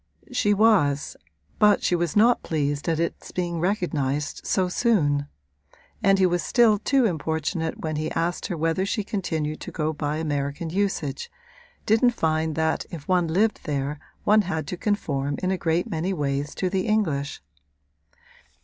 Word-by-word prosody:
She 210 -4 +2
was, 195 -10 +3 0.4
but 210 -1 +5
she 180 - +2
was 170 -3 -1
not 235 +3 +5
pleased 145 0 -1
at 160 -1 0
its 170 - -3
being 175 -2 -2
recognised 155 -7 -1
so 185 -2 +2
soon; 155 - +1 0.7
and 195 0 +4
he 190 - +4
was 175 -1 +1
still 225 -1 +4
too 270 +3 +2
importunate 160 -2 -2
when 155 -1 -2
he 155 +1 -2
asked 170 +2 -1
her 180 -4 -3
whether 165 +3 0
she 210 +2 -1
continued 160 -7 -3
to - - -7
go 155 0 -1
by 150 0 -2
American 145 +1 -2
usage, 185 -7 -2 0.6
didn't 235 +3 +3
find 160 -2 0
that 160 0 0
if 160 -4 -9
one 180 -2 +2
lived 205 +7 +1
there 145 -1 -2 0.2
one 215 +1 +5
had 165 -5 -3
to - - -3
conform 145 -8 -1
in 185 - +1
a - - +2
great 165 +1 0
many 170 +4 -2
ways 145 -2 -2
to 185 - -1
the 190 +3 -1
English. 155 - 0
165 Hz, 160 wpm, -25 LUFS, 150-195 Hz, 0.7 s, but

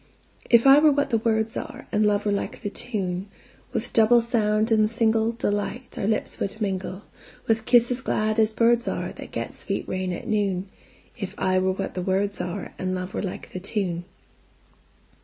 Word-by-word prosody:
If 235 0 +6
I 275 +1 +9
were 305 0 +6
what 285 0 0
the 225 - +3
words 220 0 0
are, - - -6
And 210 -1 +3
love 205 0 +1
were 205 - +2
like 200 - -3
the 205 - -3
tune, 195 -6 -3 0.4
With - - -3
double 230 +2 +6
sound 220 -2 +1
and 215 -1 +4
singleDelight 225 +1 0
our 195 - -2
lips 215 -1 -1
would 200 +2 -3
mingle, 190 -1 -3 0.4
With 225 0 +1
kisses 245 +1 +4
glad 215 -3 0
as 220 0 +4
birds 235 +2 +3
areThat - - -4
get - - -4
sweet - - -4
rain 185 0 -2
at 175 - -6
noon; 200 -3 0 0.5
If 195 - -6
I 185 0 +2
were 190 0 +1
what 195 0 -4
the 180 - -3
words 195 +2 0
areAnd 185 +1 -4
love 185 0 -5
were - - -2
like 190 -3 -6
the 185 - -5
tune. 180 -3 -2
210 Hz, 175 wpm, -25 LUFS, 190-230 Hz, 0.5 s, I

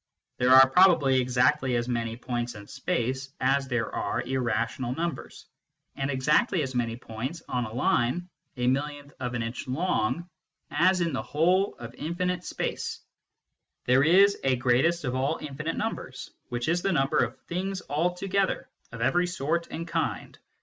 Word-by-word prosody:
There 125 - +2
are 130 +1 +9
probably 140 -5 +5
exactly 130 +1 +2
as 120 0 0
many 115 -2 -2
points 120 -1 -3
in 105 -1 -10
space 130 - -2
as 135 +1 +2
there 120 -3 -2
are - - -1
irrational 120 0 -1
numbers, 170 +1 -5 0.5
and 135 0 -2
exactly 150 - +2
as 130 -1 -4
many 115 -2 -1
points 125 +8 -6
on 125 -1 -1
a 110 - -7
line 125 +7 +1 0.3
a 125 - -1
millionth 145 +2 -1
of 125 -1 -3
an 120 - -1
inch 115 +4 -5
long 150 0 0 0.4
as 180 +5 +3
in 165 -3 0
the 130 - -1
whole 180 +6 +1
of 120 0 -9
infinite 175 +4 -2
space, - - -4 0.8
There 130 +2 +4
is 195 +5 +5
a 130 -1 +3
greatest 130 +8 +2
of 125 -2 -2
all 130 +2 0
infinite 155 +2 -4
numbers, 210 -12 -4 0.2
which 120 0 -3
is 170 +2 +1
the 195 - +1
number 135 -2 +2
of 120 +1 -1
things 190 +2 -4
altogether, 180 +5 0 0.2
of 115 0 -8
every 175 +9 +2
sort 170 0 -1
and 165 +1 -5
kind. 165 -1 -2
135 Hz, 160 wpm, -27 LUFS, 125-170 Hz, 0.8 s, are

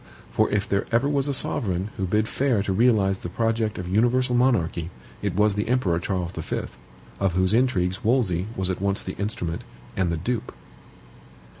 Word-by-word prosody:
For - - +2
if 100 -1 0
there 100 0 0
ever 120 +4 +3
was 140 -1 +1
a - - +1
sovereign 100 -7 0
who 95 - -2
bid 105 +3 +1
fair 125 -7 +1
to 100 - -1
realize 100 -3 +3
the 90 - -6
project 115 +2 0
of 90 - -5
universal 120 +6 +2
monarchy, 105 -10 +1 0.3
it - - -2
was 105 +1 +3
the 105 +2 -2
Emperor 115 -9 +1
Charles 90 -1 -2
V., 80 -4 -3 0.6
of 95 -3 +1
whose 95 +2 +2
intrigues 95 -7 +1
Wolsey 105 -7 +1
was 95 0 -1
at 90 - -4
once 100 0 0
the - - -5
instrument 90 -5 -3 0.3
and 90 -3 +1
the 85 - -1
dupe. 115 +7 -3
100 Hz, 180 wpm, -24 LUFS, 90-120 Hz, 0.6 s, ever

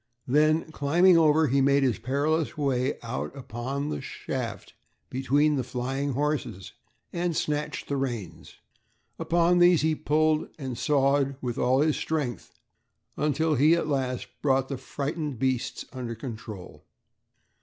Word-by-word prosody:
Then 155 +4 +2
climbing 170 +5 +4
over, 160 -1 +5
he 140 0 +2
made 140 +1 +4
his 125 -4 +1
perilous 150 +5 0
way 135 -2 0
out 125 +4 -5
upon 135 +3 -4
the 75 - -3
shaft - - -5 0.4
between 145 +3 +2
the 130 - 0
flying 130 +3 -3
horses 145 -9 -2 0.4
and 175 -1 -1
snatched 150 -1 -2
the 140 - -1
reins. 120 -7 -5 0.6
Upon 175 +1 +3
these 175 -1 +6
he 160 0 +3
pulled 155 +1 +1
and 130 -5 -5
sawed 140 +1 +2
with 120 -3 -4
all 130 +2 +3
his 155 0 +2
strength 140 - -3 0.6
until 155 +2 +1
he 150 +4 +5
at 170 - -1
last 130 -4 -1
brought 135 -2 +2
the 135 - -3
frightened 145 -1 -4
beasts 130 0 -1
under 120 -3 -5
control. 110 -5 -8
140 Hz, 135 wpm, -27 LUFS, 130-155 Hz, 0.6 s, these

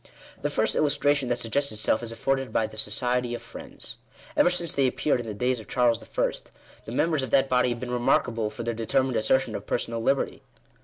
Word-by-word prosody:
The - - 0
first - - +1
illustration 145 -2 +2
that 120 0 +1
suggests 140 +5 0
itself 110 +1 +1
is 115 -1 -5
afforded 135 +1 -1
by 110 - +2
the 110 - -9
Society 120 +3 0
of - - -7
Friends. - - -9 0.4
Ever - - +5
since 175 -3 -1
they 135 -2 +3
appeared 130 +1 +1
in 120 - -5
the 105 - -4
days 125 +3 0
of 110 - -11
Charles 120 -2 +2
I., - - 0 0.5
the - - -7
members 155 +4 +1
of 130 - -3
that 135 +3 +4
body 125 -1 +3
have 120 -1 -2
been 125 0 -5
remarkable 120 -2 +1
for 110 +2 -6
their 120 0 -1
determined 130 +3 0
assertion 130 +4 +2
of - - -6
personal 115 -1 -2
liberty. 135 +4 0
125 Hz, 210 wpm, -26 LUFS, 115-135 Hz, 0.5 s, Ever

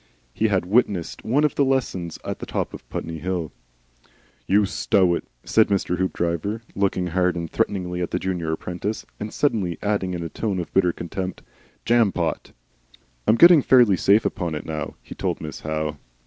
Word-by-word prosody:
(He 110 - +1
had 100 -4 +1
witnessed 100 -4 +1
one 135 +7 +2
of 150 - +2
the 140 - +2
lessons 125 - -1
at - - -4
the - - -7
top - - -2
of - - -11
Putney 80 -1 -5
Hill.) 90 -2 -3 1.0
"You 100 +1 +4
stow 95 -2 +2
it," - - -3 0.2
said 110 - +4
Mr. 90 -3 0
Hoopdriver, 95 +4 -1
looking 95 -2 +1
hard 90 +1 +1
and 85 -1 -3
threateningly 90 -3 -1
at 90 - -1
the - - -1
junior 90 -4 -2
apprentice, 90 +6 -4
and 105 +1 -5
suddenly 100 - 0
adding 100 -3 0
in 85 - -4
a - - -3
tone 100 +3 -2
of 85 - -5
bitter 90 -2 +4
contempt, 90 +2 -5 0.4
"Jampot." 105 -8 +1 0.8
"I'm 110 - +6
getting 170 +3 +8
fairly 120 -7 +5
safe 100 +4 +4
upon 85 -4 -2
it 75 - -6
now," 75 -2 -4
he - - -9
told - - -2
Miss - - -7
Howe. 75 -1 -3
95 Hz, 175 wpm, -23 LUFS, 85-105 Hz, 1.0 s, getting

